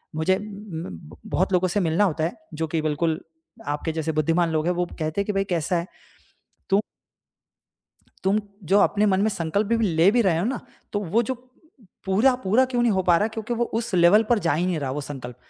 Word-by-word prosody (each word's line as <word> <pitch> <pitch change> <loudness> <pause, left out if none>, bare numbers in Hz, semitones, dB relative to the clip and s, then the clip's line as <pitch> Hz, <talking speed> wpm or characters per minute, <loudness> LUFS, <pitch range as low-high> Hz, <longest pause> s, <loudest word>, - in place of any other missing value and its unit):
मुझे 185 +4 +2
ब 165 - -8
बहुत 185 +1 0
लोगों 185 +1 +3
से 205 +4 0
मिलना 170 +3 +2
होता 160 -3 -1
है 170 - -2 0.2
जो 160 +1 -2
कि 160 +1 -1
बिल्कुल 155 +1 0 0.5
आपके 150 +2 -2
जैसे 160 0 -2
बुद्धिमान 165 +3 +2
लोग 155 0 0
हैं। 180 - +2
वो 175 0 0
कहते 155 +5 -1
हैं - - -3
कि 210 - -2
भाई 195 0 +1
कैसा 175 -2 -1
है? 170 +2 -3 0.8
तो 200 +2 +4 1.4
तुम 200 +3 +3 0.3
जो 205 - +7
अपने 210 +1 +3
मन 190 -1 +2
में 215 - +3
संकल्प 185 +4 -1
भी 230 0 +1
ले 165 +2 +4
भी 240 +2 +3
रहे 180 -6 +2
हो 175 - 0
ना 245 +2 -2 0.3
तो 205 - 0
वो 235 - +5
जो - - 0 0.7
पूरा 215 +7 +3
पूरा 220 +8 +4
क्यों 245 -2 0
नहीं 235 -3 +3
हो 190 -1 +1
पा 170 - +7
रहा 210 - +1
क्योंकि 225 +2 -3
वो 240 +1 +1 0.2
उस 220 - -5
लेवल 180 +5 +6
पर 235 - +5
जा - - +3
ही 175 +3 0
नहीं 180 -3 0
रहा 135 -2 -2
वो 150 - -3
संकल्प 130 -4 -7
180 Hz, 220 wpm, -24 LUFS, 160-210 Hz, 1.4 s, जो